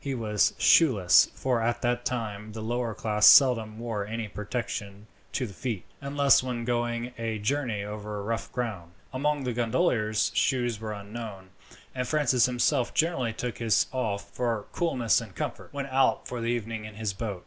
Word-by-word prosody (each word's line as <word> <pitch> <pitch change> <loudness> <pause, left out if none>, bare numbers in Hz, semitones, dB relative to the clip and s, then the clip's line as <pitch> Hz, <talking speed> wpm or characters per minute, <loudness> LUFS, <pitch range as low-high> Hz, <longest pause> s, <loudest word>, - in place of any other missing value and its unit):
He 140 -2 -2
was 105 -3 +1
shoeless, 105 - +5
for 125 -3 0
at 120 +3 -1
that 120 0 0
time 110 -4 -4
the 110 - -6
lower 120 0 -2
class 105 -1 +3
seldom 115 -6 +6
wore 115 -3 -3
any 110 +2 -4
protection 105 -1 -5 0.3
to 130 - -1
the 100 - -9
feet, 110 -2 -4 0.2
unless 140 0 +4
when 125 -2 -4
going 120 0 -1
a 115 -1 -2
journey 115 -1 -1
over 105 0 -6
rough 115 +2 -3
ground. 100 -9 -4 0.2
Among 145 +2 0
the 125 -1 -2
gondoliers 115 -3 +1
shoes 120 -5 +1
were 110 -1 -5
unknown; 100 -2 -8 0.4
and 125 -1 -3
Francis 135 -5 +3
himself 125 +1 +1
generally 155 -8 +1
took 120 +1 -5
his 110 -5 +3
off, 100 -6 -3
for 115 -3 -2
coolness 130 - +1
and - - -11
comfort, - - -5
when 140 -1 -4
out 135 -1 +1
for 120 -1 -5
the 115 - -2
evening 115 -2 -3
in 105 -1 -9
his 105 -2 -3
boat. 100 -2 -4
115 Hz, 170 wpm, -27 LUFS, 105-125 Hz, 0.4 s, seldom